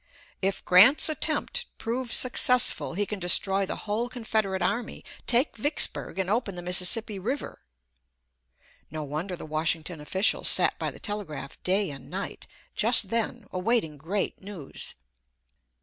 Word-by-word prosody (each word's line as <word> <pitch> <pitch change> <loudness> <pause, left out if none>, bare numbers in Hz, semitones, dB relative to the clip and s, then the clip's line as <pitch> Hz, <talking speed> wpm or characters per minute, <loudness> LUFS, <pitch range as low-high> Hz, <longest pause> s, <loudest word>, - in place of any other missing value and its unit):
"If 195 0 -1
Grant's 215 - +7
attempt 310 - -2
prove 240 +1 -4
successful 250 -7 +3
he 205 +2 0
can 210 0 -6
destroy 190 +2 +2
the - - -4
whole 220 +3 -1
Confederate 220 -6 -2
army, 235 -1 -3 0.2
take 245 +5 +2
Vicksburg, 260 -2 +1
and 190 -1 -1
open 205 -2 -1
the 175 - -7
Mississippi 190 +4 +3
River." 250 +9 -5 1.3
No 155 +1 -5
wonder 155 +6 -5
the - - -9
Washington 155 +1 -3
officials 190 +7 +1
sat - - +3
by - - -2
the - - -11
telegraph 195 -10 -6
day 190 -1 0
and 135 -1 -10
night 190 +4 -6 0.3
just 220 -3 +4
then 230 0 -2
awaiting 185 -5 -1
great 180 +8 -3
news. 190 -8 -6
195 Hz, 135 wpm, -26 LUFS, 175-230 Hz, 1.3 s, Grant's